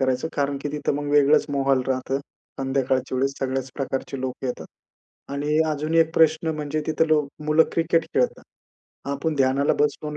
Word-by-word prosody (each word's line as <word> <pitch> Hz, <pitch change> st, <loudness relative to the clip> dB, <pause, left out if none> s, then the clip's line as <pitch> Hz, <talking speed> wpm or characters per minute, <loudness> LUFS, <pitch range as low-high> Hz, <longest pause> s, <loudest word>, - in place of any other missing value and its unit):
करायचा. 130 Hz, +3 st, 0 dB
कारण 140 Hz, -1 st, 0 dB
की -, -, -2 dB
तिथं 145 Hz, -1 st, -1 dB
मग 145 Hz, 0 st, -3 dB
वेगळंच 145 Hz, +1 st, +5 dB
माहोल 135 Hz, -1 st, +2 dB
राहतं. 130 Hz, +1 st, -1 dB, 0.4 s
संध्याकाळच्या 130 Hz, -1 st, 0 dB
वेळेस 135 Hz, +2 st, +1 dB
सगळ्याच 130 Hz, 0 st, -2 dB
प्रकारचे 135 Hz, -1 st, -4 dB
लोकं 130 Hz, 0 st, -4 dB
येतात. 125 Hz, -, -4 dB, 0.7 s
आणि 145 Hz, +2 st, 0 dB
अजून 155 Hz, +2 st, -2 dB
एक 165 Hz, -1 st, +4 dB
प्रश्न 160 Hz, 0 st, +3 dB
म्हणजे 150 Hz, 0 st, -3 dB
तिथं 160 Hz, +1 st, +1 dB
लो 150 Hz, -2 st, +3 dB, 0.2 s
मुलं 155 Hz, +1 st, +5 dB
क्रिकेट 165 Hz, 0 st, +2 dB
खेळतात. -, -, +1 dB, 0.7 s
आपण 150 Hz, +3 st, -1 dB
ध्यानाला 135 Hz, +1 st, +2 dB
बसलो 150 Hz, +1 st, 0 dB
अन 150 Hz, -, -5 dB
145 Hz, 165 wpm, -24 LUFS, 135-155 Hz, 0.7 s, वेगळंच